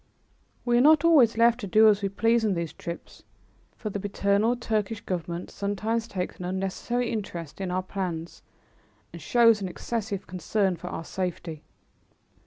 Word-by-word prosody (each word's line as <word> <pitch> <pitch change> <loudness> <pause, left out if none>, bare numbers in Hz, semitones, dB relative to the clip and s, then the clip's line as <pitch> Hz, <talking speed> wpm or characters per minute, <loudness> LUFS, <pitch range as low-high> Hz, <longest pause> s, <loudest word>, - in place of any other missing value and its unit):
We 240 -1 +3
are - - +5
not 310 +3 +6
always 270 -10 +5
left 235 +1 +4
to 205 - -5
do 215 +3 +6
as 210 -1 +4
we 200 - 0
please 225 +3 +2
on 210 -3 +1
these 170 -2 -3
trips, 170 0 -8 0.6
for 215 - -5
the 205 - -3
paternal 200 +3 +1
Turkish 220 -3 -2
Government 175 -2 -4
sometimes 215 +3 -2
takes 185 -5 -4
an 180 - -5
unnecessary 195 +6 -2
interest 185 -6 -5
in 190 - -2
our 185 +1 -1
plans 175 -3 -5 0.7
and - - -9
shows 230 -3 +4
an 190 - -2
excessive 205 +1 -4
concern 185 +2 0
for 175 +2 -9
our 165 -2 -5
safety. 175 -4 -4
200 Hz, 165 wpm, -26 LUFS, 180-230 Hz, 0.7 s, not